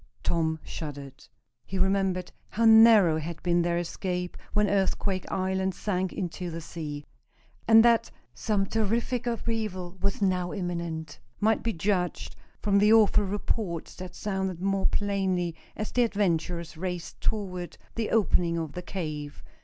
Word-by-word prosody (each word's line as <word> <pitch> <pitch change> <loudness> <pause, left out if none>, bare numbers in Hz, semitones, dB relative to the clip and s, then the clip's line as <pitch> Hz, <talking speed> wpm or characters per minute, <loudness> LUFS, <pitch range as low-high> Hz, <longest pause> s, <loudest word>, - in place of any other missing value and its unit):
Tom 160 -1 0
shuddered. 145 -3 -8 0.4
He 190 - -5
remembered 190 -1 +1 0.2
how 230 +2 0
narrow 220 -7 +7
had 165 +1 -6
been 175 0 +3
their 170 0 +1
escape 180 +1 -3 0.2
when 210 0 +2
Earthquake 195 -1 0
Island 190 0 0
sank 190 -3 -1
into 180 -1 -4
the 165 0 -5
sea. 150 -3 -6 0.6
And 225 0 +8
that 235 -1 +4 0.2
some 205 - 0
terrific 230 +4 -1
upheaval 215 -6 -3
was 200 0 0
now 185 -3 0
imminent 170 -5 -4 0.2
might 220 +1 +2
be 230 - -1
judged 180 0 -1 0.3
from 200 -1 +3
the 210 +1 +5
awful 215 -2 +5
reports 195 -3 -3
that 185 0 -8
sounded 190 -3 -2
more 195 +1 +1
plainly 190 -4 0 0.2
as 215 - -4
the 250 - +2
adventurers 175 -6 -1
raced 180 -1 -5
toward 180 -5 -3 0.2
the 225 -2 -2
opening 175 -6 +2
of 160 -3 -3
the 180 - -5
cave. 155 -6 -5
185 Hz, 140 wpm, -28 LUFS, 170-205 Hz, 0.6 s, And